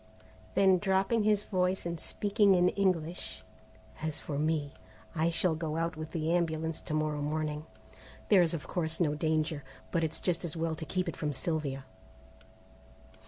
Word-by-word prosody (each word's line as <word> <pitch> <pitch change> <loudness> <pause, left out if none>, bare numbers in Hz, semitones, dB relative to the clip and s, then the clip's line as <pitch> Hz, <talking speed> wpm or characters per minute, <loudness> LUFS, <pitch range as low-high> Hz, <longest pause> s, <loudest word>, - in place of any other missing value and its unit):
Then 190 -1 +5
dropping 195 +4 +2
his 210 -1 +3
voice 185 -2 0
and 170 -1 -3
speaking 205 +1 +3
in 180 0 +5
English, 180 -4 -1 0.6
"As 155 -1 -2
for 145 -2 -4
me, 150 -2 0 0.4
I 165 -1 +2
shall 170 +1 +2
go 160 -1 -3
out 165 0 -1
with 155 0 -6
the 165 0 0
ambulance 160 -2 -1
to 155 - -3
morrow 155 -1 0
morning. 150 +1 -2 0.6
There 200 -4 +7
is 170 -1 +2
of 155 - -6
course 165 -2 -1
no 155 -4 +2
danger, 155 -1 0 0.3
but 170 -2 +1
it's 160 -1 0
just 175 -2 0
as 170 -1 -3
well 165 0 0
to 160 0 -5
keep 185 +3 -1
it 170 - -3
from 150 -1 -2
Sylvia." 140 -1 -1
165 Hz, 165 wpm, -31 LUFS, 155-180 Hz, 0.6 s, There